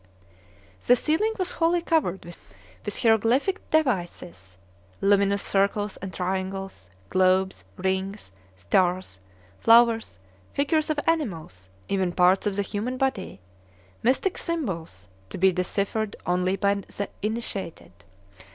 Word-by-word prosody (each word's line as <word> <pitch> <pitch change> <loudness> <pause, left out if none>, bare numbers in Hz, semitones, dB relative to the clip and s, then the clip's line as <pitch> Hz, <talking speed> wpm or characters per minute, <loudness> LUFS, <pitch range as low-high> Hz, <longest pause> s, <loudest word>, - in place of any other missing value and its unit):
The 245 - +7
ceiling 320 - +1
was 370 -2 -1
wholly 335 +1 +1
covered 310 - 0
with 95 - -9
hieroglyphic 230 - +2
devices, 175 - -1 0.4
luminous 200 0 +3
circles 200 +1 0
and 190 -1 -7
triangles, 190 - -4 0.2
globes, 185 +1 +2
rings, 190 - -2 0.2
stars, 175 - 0 0.4
flowers, 230 - +4 0.4
figures 300 +3 +1
of 305 -1 0
animals, 165 - -2 0.2
even 190 -3 0
parts 185 +3 +3
of 200 - -1
the 200 - 0
human 220 +6 -3
body, 255 - -2 0.6
mystic 265 - +1
symbols, 170 - -4 0.2
to - - -7
be 190 +1 +4
deciphered 200 +4 -2
only 180 +1 +1
by 200 +1 +2
the 200 0 -5
initiated. 210 - -4
195 Hz, 110 wpm, -25 LUFS, 180-235 Hz, 0.6 s, The